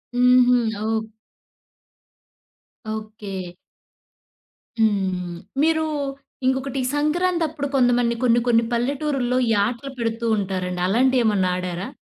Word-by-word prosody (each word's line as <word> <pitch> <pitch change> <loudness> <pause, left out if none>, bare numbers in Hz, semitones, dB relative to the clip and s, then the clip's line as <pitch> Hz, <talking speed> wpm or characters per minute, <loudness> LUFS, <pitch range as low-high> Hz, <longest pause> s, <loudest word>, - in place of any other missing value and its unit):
హుహు. 250 0 +5 0.3
ఓక్ 220 0 -1 1.9
ఓకే. 205 -5 -7 1.2
హ్మ్. 185 -5 0 0.2
మీరు 315 0 +2 0.6
ఇంకొకటి 265 +1 -1 0.2
సంక్రాంతప్పుడు 315 -1 0
కొంతమంది 245 -2 +3
కొన్ని 240 -1 +4
కొన్ని 230 -1 +4
పల్లెటూరుల్లో 255 0 0
ఈ - - +2
ఆటలు 245 +5 -4
పెడుతూంటారండి. 205 -6 -1
అలాంటివి 255 +5 +3
ఏమన్నా 195 -4 +2
ఆడారా? 180 +1 -4
235 Hz, 85 wpm, -22 LUFS, 200-265 Hz, 1.9 s, హుహు